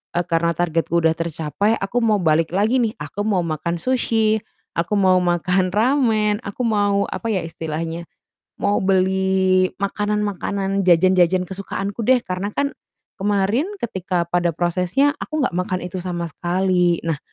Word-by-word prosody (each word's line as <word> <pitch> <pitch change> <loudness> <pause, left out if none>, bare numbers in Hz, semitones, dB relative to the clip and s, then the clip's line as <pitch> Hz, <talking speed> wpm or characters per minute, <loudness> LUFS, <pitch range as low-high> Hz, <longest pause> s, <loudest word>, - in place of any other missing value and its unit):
eee, 175 - +1
karena 170 0 +1
targetku 170 0 0
udah 160 0 +3
tercapai, 165 +6 -1
aku 195 +5 -3
mau 215 -3 +3
balik 160 0 +2
lagi 220 +6 +2
nih, 220 - -1
aku 190 +8 -4
mau 195 -5 +1
makan 170 +2 -2
sushi, 225 -4 +1 0.4
aku 170 +5 -1
mau 185 -1 +4
makan 180 +1 +1
ramen, 220 -3 +2
aku 200 +5 -6
mau 205 -2 +2
apa 230 - -4
ya 185 - 0
istilahnya, 165 +1 -5 0.6
mau 205 0 +1
beli 190 0 +2
makanan-makanan, 200 -1 -1
jajan-jajan, 180 +1 +4
kesukaanku 195 +2 -5
deh, 255 -1 +5
karena 185 +2 -3
kan 280 0 0 0.5
kemarin 205 - +1
ketika 185 -5 -2
pada 175 0 +1
prosesnya 180 - +1
aku 310 -2 -2
nggak - - -1
makan 180 0 -1
itu 180 +1 -5
sama 175 -1 -3
sekali. 180 +1 +1
Nah, 160 -3 -1
190 Hz, 145 wpm, -21 LUFS, 175-205 Hz, 0.6 s, deh